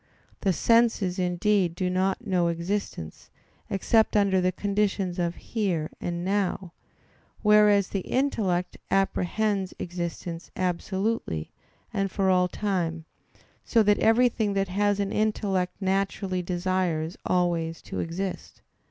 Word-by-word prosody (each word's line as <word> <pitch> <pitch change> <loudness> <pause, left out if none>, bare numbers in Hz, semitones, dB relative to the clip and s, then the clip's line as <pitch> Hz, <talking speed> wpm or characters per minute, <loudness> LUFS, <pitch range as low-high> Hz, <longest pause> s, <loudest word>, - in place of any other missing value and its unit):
The 195 - +1
senses 220 -2 +2
indeed 180 0 +1
do 185 0 -1
not 190 +5 0
know 180 -4 +2
existence, 170 - -4 0.4
except 220 +3 +2
under 195 -2 +3
the 185 0 +2
conditions 195 -2 -1
of 170 0 0
"here" 185 -9 -2
and 175 0 -3
"now," 195 -2 -1 0.7
whereas 210 -2 +5
the 195 - -1
intellect 190 -7 -1
apprehends 195 +1 0
existence 170 -1 -5
absolutely, 185 - -2 0.4
and 195 0 0
for 190 0 +1
all 180 -1 +3
time; 175 -5 -2 0.6
so 230 -2 +3
that 205 0 +3
everything 225 -2 +3
that 195 -1 0
has 205 +2 +1
an 200 -1 -1
intellect 195 -4 0
naturally 195 -1 -1
desires 175 -2 -1
always 170 -2 0
to - - -5
exist. 180 +3 -5
190 Hz, 115 wpm, -26 LUFS, 175-205 Hz, 0.7 s, whereas